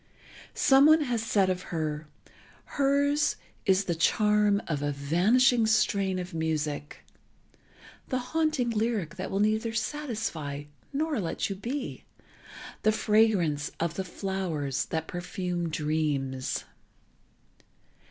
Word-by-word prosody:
Someone 295 +3 +6
has 245 -6 -1
said 205 -4 +2
of 180 0 -3
her: 155 -2 -3 0.6
"Hers 285 +1 +2 0.3
is 190 0 +4
the 175 - -1
charm 210 +4 +3
of 150 -3 -2
a 145 0 0
vanishing 220 - +3
strain 200 -3 +2
of 180 0 -5
music, 155 -2 -3 1.0
the 255 - -1 0.2
haunting 310 -7 +1
lyric 215 -7 -1
that 185 - -4
will 195 - -1
neither 220 +2 +1
satisfy, 220 - -3 0.3
nor 300 -1 -1
let 180 +2 -2
you - - -2
be—the 250 +8 -5 0.9
fragrance 210 -9 +2
of 170 0 -1
the 190 - -3
flowers 175 -8 -2
that 160 -1 -3
perfume 175 -1 -3
dreams." 150 -4 -1
190 Hz, 110 wpm, -28 LUFS, 160-230 Hz, 1.0 s, Someone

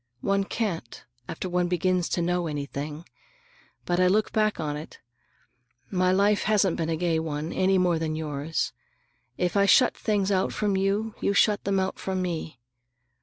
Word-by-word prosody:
One 195 0 +1
can't, 185 - -4 0.2
after 175 - -4
one 180 0 0
begins 180 0 0
to 175 - 0
know 175 0 0
anything. 150 +1 -5 0.8
But 175 0 0
I 185 - +5
look 210 +4 +2
back 215 -3 +1
on 150 -2 -2
it. 150 +2 -9 0.9
My 185 -1 +2
life 200 +2 +3
hasn't 200 -4 +3
been 165 -1 -1
a 165 - +1
gay 165 -1 +1
one, 155 0 -3
any 190 0 +2
more 175 -3 +2
than 155 -1 -2
yours. 155 0 -2 0.6
If 180 +1 -1
I 200 0 +4
shut 250 - +5
things 205 -2 0
out 190 -1 +1
from 205 -2 0
you, 200 +3 0
you 200 - +1
shut 210 0 +3
them 195 -1 +1
out 190 0 -2
from 190 -1 -2
me. 165 -6 -3
180 Hz, 170 wpm, -26 LUFS, 160-195 Hz, 0.9 s, I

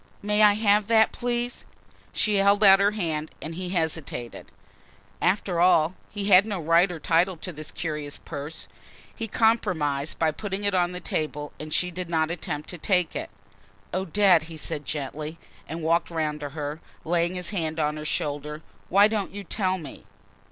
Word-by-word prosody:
"May 210 +1 +2
I 210 -1 +7
have 210 -1 +3
that 220 -1 +5
please?" 245 0 -2 0.5
She 210 -2 +1
held 200 +1 +4
out 195 -1 +8
her 200 +1 +4
hand 160 -7 -2
and 160 - -6
he 180 +1 -5
hesitated. 160 -8 -3 0.7
After 185 -2 +1
all, 170 -2 +4 0.2
he 205 -1 -4
had 200 +1 +6
no 200 -4 -2
right 170 +3 +3
or 170 - -6
title 170 +3 +2
to 180 +2 -6
this 155 0 -7
curious 150 -3 -4
purse. 150 +1 -7 0.5
He 225 - -4
compromised 180 - +1
by 160 -1 +2
putting 200 +4 -5
it 200 -1 0
on 180 -1 +1
the 180 - -5
table 150 -3 -3
and 155 0 -7
she 180 +3 +1
did 180 0 -5
not 160 -1 +1
attempt 150 -3 -4
to 175 - -8
take 180 -1 +1
it. - - -4 0.6
"Odette," 185 -2 +3
he 165 -1 -9
said 150 -1 -2
gently 150 +2 -4 0.3
and 165 +1 -5
walked 165 +2 +2
round 155 -3 -2
to 145 -1 -5
her, 150 +2 -5 0.2
laying 175 +2 +1
his 180 +1 -2
hand 160 -5 -2
on 150 0 0
her 150 - -6
shoulder. 150 +1 -3 0.3
"Why 200 +2 +6
don't 215 -3 -2
you 205 - -5
tell 190 0 0
me?" 155 -6 -10
170 Hz, 180 wpm, -26 LUFS, 155-200 Hz, 0.7 s, out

